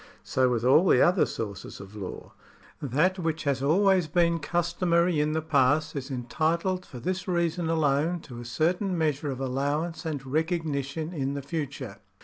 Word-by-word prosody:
So 130 -1 +2
with 120 -1 0
all 155 +8 +5
the - - +5
other 180 +1 +4
sources 100 -4 -6
of 100 +1 -11
law. 100 -3 -7 0.5
That 150 +8 +1
which 160 -2 -2
has 140 -3 0
always 185 +4 +3
been 170 +1 +2
customary 170 +1 +1
in 150 +1 +1
the 160 0 -1
past 150 +1 +2
is 135 -1 -4
entitled 160 +8 -1
for 125 - -9
this 185 +5 -3
reason 170 -2 0
alone 160 +2 +1
to 120 -6 -10
a 120 - -8
certain 175 - 0
measure 150 -2 0
of 130 -2 -4
allowance 145 +6 -2
and 150 -5 -4
recognition 155 0 -2
in 140 -3 -2
the 140 - -4
future. 140 -8 -5
155 Hz, 165 wpm, -27 LUFS, 135-170 Hz, 0.5 s, all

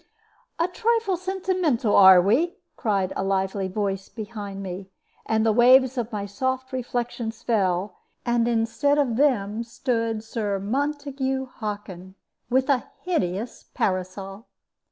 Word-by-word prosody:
"A 335 - +2
trifle 450 +1 +1
sentimental, 365 - 0
are 190 -2 +9
we?" 240 - +2 0.2
cried 195 -6 0
a - - -1
lively 195 0 0
voice 195 0 -3
behind 205 -3 -7
me, 190 +1 -6 0.4
and 220 0 +2
the 220 - +4
waves 255 +2 +6
of 240 -2 -3
my 205 -2 -3
soft 260 +6 -3
reflections 240 -2 -3
fell, 195 -4 0 0.3
and 235 -1 +2
instead 240 +5 +1
of 265 -6 +1
them 230 -6 +1
stood 230 -2 -2
Sir 215 -3 -2
Montague 270 +4 -2
Hockin, 205 -6 -7 0.3
with 260 +2 +2
a 275 -4 +1 0.2
hideous 215 - -2
parasol. 195 +3 -3
230 Hz, 125 wpm, -24 LUFS, 200-265 Hz, 0.4 s, are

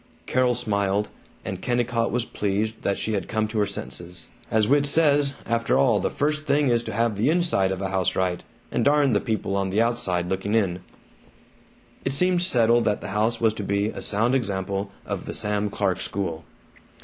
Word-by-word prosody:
Carol 125 -1 +2
smiled, 100 -3 0 0.4
and 95 -1 -5
Kennicott 120 -1 0
was 120 0 -1
pleased 105 +2 -2
that 100 - 0
she 110 - -2
had 100 - -2
come 110 0 0
to 110 0 -2
her 105 - +2
senses. 85 -1 -7 0.2
"As 110 -1 +2
Whit 145 +1 +3
says, 145 -2 +3
after 115 +2 +1
all 125 -6 +4
the - - 0
first 150 +1 -1
thing 145 -1 +3
is 120 -1 +3
to - - -4
have 115 0 0
the 105 +8 +1
inside 160 - +2
of 95 +1 -3
a 95 - -1
house 95 -2 0
right, 90 -2 -1 0.3
and - - 0
darn 145 -3 +4
the 100 - +2
people 110 -3 -2
on 100 -1 0
the 100 +3 0
outside 95 -7 -1
looking 95 +3 -1
in!" 95 -5 +1 1.2
It - - 0
seemed 180 +4 +2
settled 120 - +3
that 105 -1 0
the - - -6
house 105 +4 0
was 110 -2 +3
to 105 - -5
be 100 +1 0
a - - -7
sound 115 +5 +1
example 100 -4 -1 0.2
of - - -5
the - - -4
Sam 105 -1 0
Clark 95 -2 -1
school. 85 -5 -3
110 Hz, 195 wpm, -24 LUFS, 100-125 Hz, 1.2 s, all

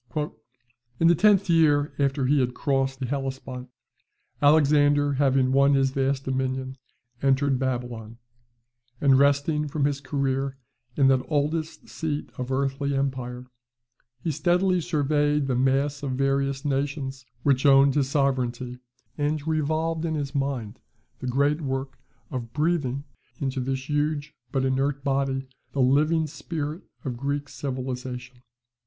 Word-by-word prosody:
"In 165 - +5
the - - +7
tenth 200 +3 +4
year 155 -3 +3
after 140 -1 +1
he 145 +2 +3
had 125 -1 0
crossed 135 -1 0
the 130 - -2
Hellespont, 130 -1 -4 0.7
Alexander, 145 -1 +4
having 135 -2 +2
won 140 +1 +4
his 135 -1 +2
vast 135 0 0
dominion, 130 0 -2 0.4
entered 135 -1 +2
Babylon; 120 -3 -3 0.8
and 135 -2 +5
resting 145 +2 +2
from 145 0 -1
his 140 -1 -1
career 135 -1 -1 0.4
in 135 -2 +5
that 130 -1 +3
oldest 155 +2 -1
seat 150 -2 -4
of 125 +1 -3
earthly 140 +1 0
empire, 130 -2 -2 0.8
he 165 - 0
steadily 175 +4 +2
surveyed 150 -2 +1
the 135 - 0
mass 135 +3 +1
of 135 -2 -2
various 135 +1 0
nations 140 -1 -2 0.2
which 140 -2 +3
owned 135 0 +6
his 140 -2 +1
sovereignty, 125 -3 -1 0.4
and 145 0 -1
revolved 160 +1 0
in 160 -2 -1
his 145 -2 -3
mind 135 -6 -2 0.4
the 130 - -5
great 140 +5 +1
work 135 -1 -4 0.3
of 120 -3 -5
breathing 145 -4 0 0.4
into 135 -1 -2
this 130 +1 -3
huge 150 0 -1 0.2
but 135 -1 0
inert 135 +1 0
body 135 -1 0 0.3
the 140 - -3
living 150 +5 +3
spirit 150 +2 -5 0.2
of 125 -3 -2
Greek 140 +2 -2
civilization. 125 -2 -5
140 Hz, 135 wpm, -25 LUFS, 130-145 Hz, 0.8 s, the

